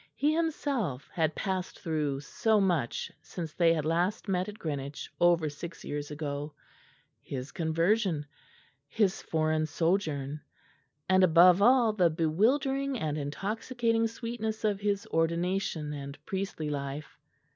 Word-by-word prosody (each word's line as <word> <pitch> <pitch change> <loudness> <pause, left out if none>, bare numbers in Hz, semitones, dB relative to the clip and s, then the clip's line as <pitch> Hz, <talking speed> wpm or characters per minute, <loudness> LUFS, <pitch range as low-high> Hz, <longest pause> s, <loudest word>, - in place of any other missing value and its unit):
He 295 +2 +2
himself 280 - -1
had 160 -2 +1
passed 190 -2 -3
through 150 -5 -1
so 220 +8 +1
much 175 -11 0
since 165 -4 -6
they 170 -2 +4
had 155 -3 0
last 175 +7 0
met 185 0 0
at 210 - -9
Greenwich 145 -4 -5
over 170 -2 +4
six 165 +3 -7
years 145 0 -4
ago 150 0 -4 0.7
his 130 0 -6
conversion, 165 0 +1 0.6
his 195 +4 +1
foreign 155 -1 0
sojourn, 155 -4 -1 0.7
and, 185 0 +5
above 180 +2 +7
all, 240 0 +5
the 180 -5 +4
bewildering 260 - +1
and 155 -7 -2
intoxicating 225 - -1
sweetness 225 -1 -4
of 205 -2 +1
his 200 -1 0
ordination 165 -1 0
and 140 0 -7
priestly 190 -6 -3
life. 140 +1 -5
170 Hz, 125 wpm, -30 LUFS, 150-210 Hz, 0.7 s, above